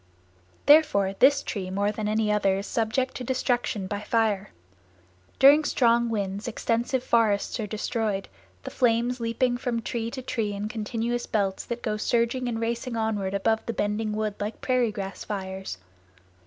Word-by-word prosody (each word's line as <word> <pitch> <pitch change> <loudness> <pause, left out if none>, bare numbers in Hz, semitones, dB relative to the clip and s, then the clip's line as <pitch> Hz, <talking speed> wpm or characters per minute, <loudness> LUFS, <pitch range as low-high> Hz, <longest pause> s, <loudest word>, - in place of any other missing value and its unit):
Therefore 285 -11 +5
this 280 +1 +5
tree 190 -3 -4
more 200 +2 0
than 215 0 -3
any 215 0 +1
other 200 -2 +2
is 200 - -4
subject 235 +4 -1
to 255 - -5
destruction 245 -5 -1
by 200 +2 -4
fire. 210 -2 0 0.9
During 285 +3 +7
strong 235 -4 +3
winds 200 -1 -3
extensive 240 +2 -1
forests 225 -1 +2
are 215 - -2
destroyed, 210 -1 -2 0.4
the - - -6
flames 245 0 +1
leaping 235 +2 0
from 240 -2 -1
tree 230 0 -3
to 260 +1 -7
tree 220 -5 -2
in 200 +1 -3
continuous 235 +1 -2
belts 195 -3 -1
that 240 0 -5
go 215 -3 -1
surging 235 +3 0
and 225 -1 -2
racing 235 +1 -2
onward 205 -3 -1
above 220 +3 +1
the 230 - -1
bending 210 +1 -1
wood 215 -1 -1
like 210 +2 -4
prairie 250 -3 +1
grass 195 -2 -6
fires. 190 - -5
225 Hz, 160 wpm, -26 LUFS, 205-240 Hz, 0.9 s, During